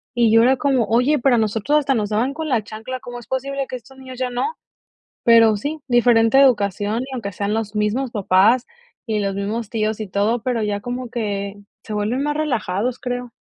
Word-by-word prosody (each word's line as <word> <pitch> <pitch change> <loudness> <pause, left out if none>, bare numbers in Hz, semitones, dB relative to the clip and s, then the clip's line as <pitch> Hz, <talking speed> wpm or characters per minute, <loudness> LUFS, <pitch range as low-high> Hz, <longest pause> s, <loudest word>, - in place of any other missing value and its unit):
Y 235 -2 +3
yo 225 - +7
era 260 +2 +4
como: 265 -4 +1
"Oye, 250 +7 +2
pero 250 0 +3
a - - +2
nosotros 225 +6 +1
hasta 280 -2 +1
nos 210 -5 -1
daban 230 +6 0
con 315 +1 -4
la 235 -5 +1
chancla, 220 +5 -7
¿cómo 245 0 -8
es 240 - -15
posible 275 +1 -3
que - - -4
a - - -3
estos 265 +3 -17
niños 260 -1 -10
ya 255 -1 -1
no?". 335 - -2 0.7
Pero 230 -2 +6
sí, 295 +9 -4
diferente 240 0 +4
educación, 210 -4 +2
y 265 0 -8
aunque 210 -6 -5
sean 200 +2 -2
los 220 -1 -3
mismos 215 +5 0
papás, 210 +3 +3 0.4
y 215 -2 0
los 195 -1 -1
mismos 205 +2 -3
tíos, 215 -1 -1
y 215 - -4
todo, 205 +5 0
pero 245 -3 -1
ya 205 -1 -1
como 245 +2 -5
que 205 -4 -3 0.3
se 215 - -7
vuelven 215 +6 -1
más 295 0 -1
relajados, 245 -5 -1
creo. 245 -1 -4
235 Hz, 215 wpm, -21 LUFS, 210-255 Hz, 0.7 s, yo